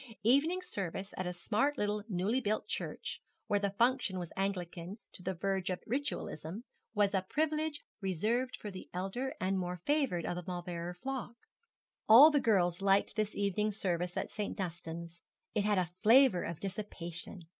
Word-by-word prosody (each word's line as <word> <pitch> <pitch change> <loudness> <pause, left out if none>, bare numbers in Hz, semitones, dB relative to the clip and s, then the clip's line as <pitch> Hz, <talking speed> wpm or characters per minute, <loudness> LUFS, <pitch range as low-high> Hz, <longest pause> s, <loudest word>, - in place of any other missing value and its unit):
Evening 300 - +3
service 195 - -4
at 185 - -3
a - - -1
smart 220 +11 0
little 210 -1 0
newly 205 +7 +1
built 215 -1 -1
church, - - -4 0.2
where 205 - +2
the 200 0 +1
function 230 -2 +2
was 175 -2 -5
Anglican 185 -1 -3 0.2
to - - -11
the 185 +1 -2
verge 190 +1 -1
of 185 - -3
Ritualism, 230 - -3 0.3
was 205 -1 +3
a 190 - +3
privilege 305 +7 -1 0.2
reserved 220 +7 0
for 210 - -6
the 185 - -9
elder 195 +9 -2
and 190 +1 +1
more 180 0 -3
favoured 275 - +1
of 175 - -2
the 180 - -4
Mauleverer 175 -1 -4
flock. 255 +3 -4 0.7
All 270 +8 +11
the 295 - +4
girls 180 -7 +2
liked 195 0 +3
this 215 -1 -1
evening 205 +1 +1
service 180 -4 -2
at - - -2
St. 210 0 -3
Dunstan's. 170 -2 -5 0.3
It 210 -2 +1
had 210 -1 +3
a 180 -2 0
flavour 230 -4 +6
of 170 -2 -5
dissipation. 185 -2 -5
195 Hz, 165 wpm, -33 LUFS, 180-230 Hz, 0.7 s, All